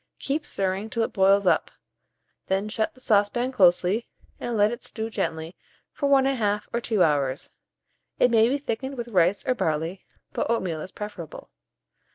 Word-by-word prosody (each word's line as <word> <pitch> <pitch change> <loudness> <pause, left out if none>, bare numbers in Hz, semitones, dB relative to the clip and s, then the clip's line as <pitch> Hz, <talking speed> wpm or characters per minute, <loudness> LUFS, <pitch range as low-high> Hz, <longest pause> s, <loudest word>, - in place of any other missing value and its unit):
Keep 295 +2 -3
stirring 195 +2 -2
till 230 0 0
it - - -3
boils 195 0 +4
up; - - +2 0.8
then 195 +2 0
shut 220 +3 -2
the - - -18
saucepan 235 +2 +1
closely, 185 +1 +3 0.3
and 235 -2 -3
let 205 +1 +4
it 240 +1 -7
stew 225 0 -5
gently 165 -4 -3 0.4
for 280 - -1
1 275 -1 +5
1/2 210 -6 0
or 235 - 0
2 215 -6 +2
hours. 145 0 0 0.7
It 245 - +4
may 225 0 +5
be 275 - +1
thickened 265 0 -4
with 240 0 -5
rice 185 -1 +2
or 255 - +2
barley, 165 -2 -2 0.3
but - - -2
oatmeal 185 -9 -1
is 185 - -7
preferable. 205 -7 -8
210 Hz, 170 wpm, -25 LUFS, 185-240 Hz, 0.8 s, 1